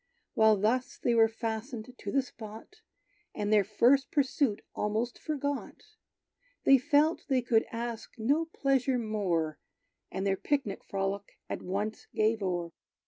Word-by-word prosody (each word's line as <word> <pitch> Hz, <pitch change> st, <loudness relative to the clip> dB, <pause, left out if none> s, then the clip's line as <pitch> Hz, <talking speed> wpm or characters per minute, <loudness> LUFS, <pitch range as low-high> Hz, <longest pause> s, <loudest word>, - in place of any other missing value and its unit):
While 220 Hz, -1 st, +5 dB
thus 235 Hz, +6 st, 0 dB
they 240 Hz, -, +1 dB
were 225 Hz, -1 st, +6 dB
fastened 225 Hz, +2 st, -5 dB
to -, -, -6 dB
the 275 Hz, -1 st, +2 dB
spot, 225 Hz, -, -11 dB, 0.6 s
And 210 Hz, +1 st, 0 dB
their 210 Hz, -1 st, +6 dB
first 245 Hz, +7 st, +3 dB
pursuit 270 Hz, -5 st, +1 dB
almost 220 Hz, +4 st, -1 dB
forgot, 285 Hz, -2 st, -3 dB, 0.8 s
They 270 Hz, -1 st, +7 dB
felt 300 Hz, +4 st, +2 dB
they 260 Hz, -4 st, +2 dB
could 225 Hz, -2 st, +2 dB
ask 230 Hz, -1 st, -5 dB
no 280 Hz, +9 st, +2 dB
pleasure 270 Hz, -4 st, +1 dB
more, 190 Hz, -9 st, -1 dB, 0.5 s
And 190 Hz, -, -3 dB
their 195 Hz, -1 st, +1 dB
picnic 270 Hz, -8 st, -1 dB
frolic 195 Hz, +1 st, -3 dB
at -, -, -4 dB
once 205 Hz, +4 st, -3 dB
gave 220 Hz, 0 st, +2 dB
o'er. 175 Hz, -3 st, -2 dB
225 Hz, 140 wpm, -30 LUFS, 210-265 Hz, 0.8 s, They